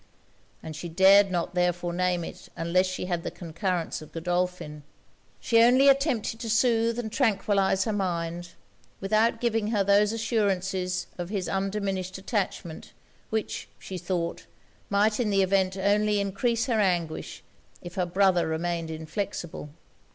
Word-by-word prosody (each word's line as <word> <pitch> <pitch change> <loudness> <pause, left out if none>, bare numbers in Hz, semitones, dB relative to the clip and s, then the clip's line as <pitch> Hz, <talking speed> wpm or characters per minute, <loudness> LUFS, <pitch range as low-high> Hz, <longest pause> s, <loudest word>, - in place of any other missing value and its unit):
And 160 -1 -7
she 170 +3 -6
dared 195 +3 +6
not 175 -1 -2
therefore 175 -1 0
name 180 -1 0
it - - -9
unless 175 +3 +2
she 185 0 -4
had 175 -2 -2
the - - -4
concurrence 170 0 -3
of 155 - -12
Godolphin. 175 -2 -2 0.6
She 230 -1 +3
only 255 +4 +6
attempted 265 -5 +1
to 230 - -5
soothe 230 0 +2
and 225 -3 -4
tranquillize 200 -5 +2
her 220 - -2
mind, 175 -3 -3 0.5
without 220 +4 +2
giving 225 -3 0
her 210 -3 +1
those 200 +1 +4
assurances 195 -5 -1
of 175 0 -4
his 195 -3 -2
undiminished 195 -1 -2
attachment, 190 -4 -4 0.4
which, 220 -1 -3
she 185 -1 -7
thought, 175 -1 -3 0.4
might 210 +2 +2
in 235 -4 +1
the 195 -1 +3
event 190 0 +1
only 205 +2 +2
encrease 230 +4 0
her 235 -4 0
anguish, 175 -5 -1 0.4
if 175 - -8
her 185 -3 -1
brother 180 -2 +3
remained 165 +1 -2
inflexible. 160 0 -5
190 Hz, 145 wpm, -27 LUFS, 175-215 Hz, 0.6 s, dared